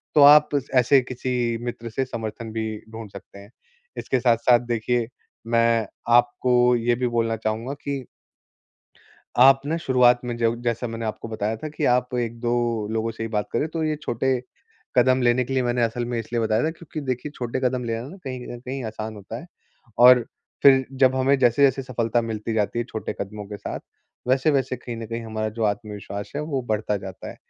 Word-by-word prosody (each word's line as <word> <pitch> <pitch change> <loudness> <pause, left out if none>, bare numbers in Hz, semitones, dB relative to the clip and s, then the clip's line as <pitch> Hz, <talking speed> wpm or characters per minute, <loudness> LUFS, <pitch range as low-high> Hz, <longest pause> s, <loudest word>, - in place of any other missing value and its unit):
तो 150 - +7
आप 150 0 +5 0.3
ऐसे 130 +2 +5
किसी 125 -2 -2
मित्र 120 -1 -5
से 130 +4 -2
समर्थन 115 -2 -6
भी 110 0 -2 0.2
ढूँढ 110 -1 -8
सकते 100 0 -12
हैं। 100 +2 -14 0.5
इसके 130 - 0
साथ-साथ 120 0 +4
देखिए, 120 0 0 0.4
मैं 115 -1 +2 0.3
आपको 120 0 +3
ये 120 0 +1
भी 125 +1 -1
बोलना 115 -1 0
चाहूँगा 110 +4 -3
कि 140 -2 -3 1.4
आप 135 +1 +8
ना 160 +3 0
शुरुआत 125 -4 +4
में 120 -1 -3
जब 115 0 0
जैसा 120 0 -1
मैंने 115 0 -5
आपको 110 +1 -5
बताया 110 0 -2
था 155 - -6
कि 150 - -4
आप 125 0 0
1-2 120 0 -2 0.4
लोगों 110 0 -1
से 115 - -7
ही 115 - -3
बात 105 -2 -1
करें। - - +1
तो 160 0 -3
ये 155 0 0
छोटे 120 +3 -1 0.7
कदम 130 +1 +4
लेने 125 +1 +3
के 135 - -6
लिए 130 - +2
मैंने 120 0 0
असल 115 +1 0
में 120 -1 -2
इसलिए 115 +1 -2
बताया 110 +1 +1
था 160 - +1
क्योंकि 160 -1 -8
देखिए 130 +3 -2
छोटे 120 +1 -3
कदम 125 0 0
लेना 115 -1 -2
ना 180 - -11
कहीं-कहीं 130 0 -6
आसान 110 0 -5
होता 105 +2 -8
है - - -12 0.5
और 125 0 +8 0.4
फिर 135 -1 +7 0.2
जब 130 0 +6
हमें 135 +1 +3
जैसे-जैसे 135 +2 +3
सफलता 120 -2 0
मिलती 110 0 -4
जाती 110 +1 0
है 120 - 0
छोटे 110 - -4
कदमों 105 +1 -5
के 105 +1 -7
साथ, - - -6 0.5
वैसे-वैसे 130 0 +2
कहीं 120 -1 -7
न 115 0 -6
कहीं 115 +1 -5
हमारा 110 -1 -2
जो 110 +1 -3
आत्मविश्वास 105 -1 -4
है 150 - -1
वो 150 -3 -2
बढ़ता 105 -1 0
जाता 95 -1 -8
है। - - -12
120 Hz, 190 wpm, -24 LUFS, 115-130 Hz, 1.4 s, आप